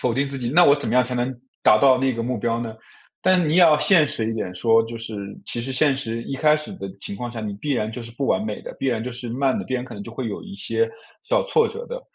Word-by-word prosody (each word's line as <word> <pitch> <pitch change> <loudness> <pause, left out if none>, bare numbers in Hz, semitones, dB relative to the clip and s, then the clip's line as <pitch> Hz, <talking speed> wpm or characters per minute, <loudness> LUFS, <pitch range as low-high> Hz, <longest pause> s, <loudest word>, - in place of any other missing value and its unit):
否 125 - +1
定 135 +3 0
自 135 - -5
己。 120 -2 -3
那 175 +6 +6
我 140 - +7
怎 145 - -3
么 - - 0
样 125 -1 +5
才 125 - -2
能 125 +1 -1 0.3
达 110 - +6
到 130 -2 +5
那 135 0 +1
个 115 0 -3
目 125 0 -2
标 115 +2 -1
呢？ 115 -2 -5 0.5
但 185 -3 +4
你 155 +3 +1
也 - - +6
要 155 -3 +7
现 165 -7 +5
实 110 0 -2
一 - - -2
点 110 -5 -4
说， 115 +4 +4
就 115 +1 -7
是 115 -1 -6 0.3
其 120 - -2
实 130 +2 -4
现 140 +1 +3
实， 115 -3 -3
一 135 - -5
开 150 +2 +4
始 150 +7 -7
的 100 - -6
情 - - -5
况 120 +4 -5
下， 120 - -7
你 110 -2 -4
必 145 - -1
然 110 -3 -1
就 120 - -6
是 115 - -8
不 135 +3 -3
完 215 - +2
美 220 - -5
的， - - -8
必 135 - -2
然 115 -3 0
就 125 - -4
是 120 0 -6
慢 130 +3 +1
的， - - -3
必 130 - -3
然 125 0 -2
可 - - -11
能 - - -7
就 - - -9
会 130 - -4
有 105 - -5
一 200 -1 -9
些 455 - -1 0.3
小 - - +1
挫 455 -1 +3
折 465 +2 -7
的。 - - -6
130 Hz, 335 characters per minute, -23 LUFS, 115-150 Hz, 0.5 s, 我